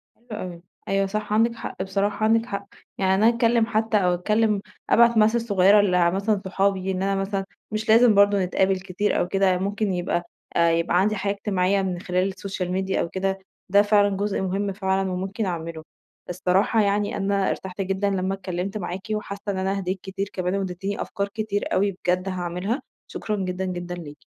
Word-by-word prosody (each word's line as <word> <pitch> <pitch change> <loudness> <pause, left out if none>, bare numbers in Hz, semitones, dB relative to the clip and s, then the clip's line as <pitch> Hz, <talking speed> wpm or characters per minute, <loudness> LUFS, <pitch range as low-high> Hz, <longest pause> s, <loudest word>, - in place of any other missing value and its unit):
حلو 240 - -33
أوي، 180 -5 -6 0.3
أيوه 195 0 +1
صح 210 +1 -3
عندِك 230 +2 +3
حق، 225 -4 -5
بصراحة 200 +2 -1
عندِك 225 +1 +3
حق، 200 -5 -5 0.3
يعني 190 -1 +2
أنا 215 +4 +5
أتكلم 235 -1 +3
حتى 220 -1 +1
أو 180 -3 +2
أتكلم 210 +3 +1 0.3
أبعت 235 0 +6
message 220 +2 +4
صغيرة 200 -1 +5
لمثلًا 195 +2 +2
صحابي، 190 0 0
إن 185 0 -2
أنا 195 0 +1
مثلًا 195 0 -2 0.3
مش 215 0 -3
لازم 225 0 +6
برضه 200 -1 +4
نتقابل 190 +1 +1
كتير 190 +2 -1
أو - - 0
كده، 195 +1 +1
يعني 185 -1 +3
ممكن 205 0 -1
يبقى 175 -1 -1 0.3
يبقى 170 +1 +3
عندي 210 +3 +2
حياة 200 0 -1
اجتماعية 195 -1 0
من 185 -2 -2
خلال 185 -1 0
السوشيال 190 -1 -4
ميديا 190 +1 0
أو - - -2
كده، 190 +2 -2 0.3
ده 200 +2 +6
فعلًا 205 -1 +3
جزء 205 0 -1
مهم 195 +1 -1
فعلًا 190 -1 0
وممكن 190 +4 -3
أعمله. 165 -3 -4 0.5
الصراحة 185 +5 +2
يعني 205 0 0
أنا 200 -1 +1
ارتحت 190 0 -4
جدًا 195 +1 0
لما 190 -1 -1
اتكلمت 190 +1 -4
معاكِ، 190 +1 -5
وحاسة 205 -1 -5
إن 195 - -4
أنا 190 +1 -1
هِديت 190 0 -3
كتير 195 +1 -4
كمان، 185 0 -1
واديتيني 195 +1 -3
أفكار 200 -2 -3
كتير 205 0 -3
أوي 200 +2 +2
بجد 180 0 -1
هاعملها، 185 - -2 0.3
شكرًا 215 - -3
جدًا، 190 -1 -3
جدًا 175 -1 -4
ليكِ. 150 -4 -9
195 Hz, 185 wpm, -24 LUFS, 185-205 Hz, 0.5 s, أبعت